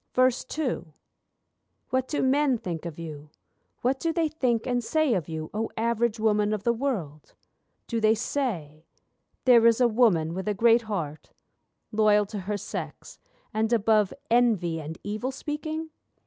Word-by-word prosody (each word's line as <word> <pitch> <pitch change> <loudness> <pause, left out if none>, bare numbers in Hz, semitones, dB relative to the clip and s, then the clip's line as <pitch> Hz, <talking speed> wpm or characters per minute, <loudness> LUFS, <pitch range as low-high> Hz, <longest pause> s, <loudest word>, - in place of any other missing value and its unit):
II 255 - 0 1.0
What 260 0 +1
do 295 - -1
men 270 0 +3
think 175 -5 -5
of 165 - -8
you, 155 -3 -8 0.5
what 265 +2 +1
do 330 - 0
they 325 -1 0
think 250 -7 0
and 245 -1 0
say 310 +1 +2
of 175 -7 -2
you, 155 -1 -5
O 220 +2 -2
Average 235 0 0
Woman 210 -1 +2
of 210 -2 -3
the 235 - +2
world? 205 - -4 0.5
Do 230 -2 -2
they 220 +1 +4
say: 180 - -3 0.6
'There 235 -3 +7
is 230 0 +4
a 245 - +5
woman 210 -9 +3
with 190 +3 -5
a 210 - 0
great 230 +3 +5
heart, 160 -7 -4 0.6
Loyal 210 -1 +4
to 205 +1 -6
her 205 +2 -3
sex, - - -7 0.3
and 220 +1 0
above 215 -3 +3 0.2
envy 210 -9 +2
and 160 +1 -7
evil 215 +6 -3
speaking? 310 +3 -5
220 Hz, 155 wpm, -26 LUFS, 185-255 Hz, 1.0 s, There